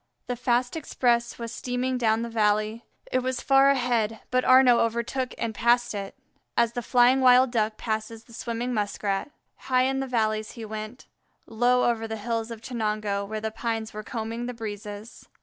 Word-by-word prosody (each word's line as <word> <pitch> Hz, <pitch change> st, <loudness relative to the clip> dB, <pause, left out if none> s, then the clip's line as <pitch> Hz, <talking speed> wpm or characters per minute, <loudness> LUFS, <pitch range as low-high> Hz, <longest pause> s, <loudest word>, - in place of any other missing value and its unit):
The 245 Hz, -, -3 dB
fast 245 Hz, +1 st, 0 dB
express 240 Hz, -6 st, 0 dB
was 230 Hz, -1 st, -6 dB
steaming 250 Hz, +1 st, -2 dB
down 225 Hz, -1 st, +2 dB
the -, -, -3 dB
valley. 215 Hz, 0 st, +1 dB, 0.3 s
It 255 Hz, -, +2 dB
was 255 Hz, 0 st, -2 dB
far 270 Hz, 0 st, +5 dB
ahead, 240 Hz, -5 st, +1 dB
but 255 Hz, 0 st, +2 dB
Arnaux 255 Hz, -2 st, +6 dB
overtook 235 Hz, +3 st, -1 dB
and 225 Hz, -1 st, -2 dB
passed 240 Hz, +2 st, +2 dB
it, 200 Hz, -1 st, -5 dB, 0.4 s
as 235 Hz, -1 st, +3 dB
the 245 Hz, -, -3 dB
flying 250 Hz, +2 st, +4 dB
wild 255 Hz, 0 st, +6 dB
Duck 220 Hz, -2 st, 0 dB
passes 220 Hz, 0 st, -4 dB
the 235 Hz, -, -18 dB
swimming 235 Hz, +2 st, -3 dB
Muskrat. 205 Hz, +1 st, -2 dB, 0.3 s
High 255 Hz, -1 st, +1 dB
in 270 Hz, +1 st, 0 dB
the 270 Hz, -, -2 dB
valleys 215 Hz, -3 st, -1 dB
he 230 Hz, -2 st, -7 dB
went, 215 Hz, +3 st, -7 dB, 0.4 s
low 245 Hz, +2 st, +2 dB
over 225 Hz, -1 st, 0 dB
the 220 Hz, 0 st, -4 dB
hills 225 Hz, +1 st, -3 dB
of 230 Hz, -2 st, -8 dB
Chenango, 215 Hz, -4 st, -2 dB
where 215 Hz, +1 st, -4 dB
the 220 Hz, 0 st, -3 dB
pines 225 Hz, -1 st, -3 dB
were 215 Hz, -, -5 dB
combing 230 Hz, +2 st, -4 dB
the 250 Hz, -, -5 dB
breezes. 210 Hz, 0 st, -8 dB
230 Hz, 180 wpm, -26 LUFS, 220-250 Hz, 0.4 s, Arnaux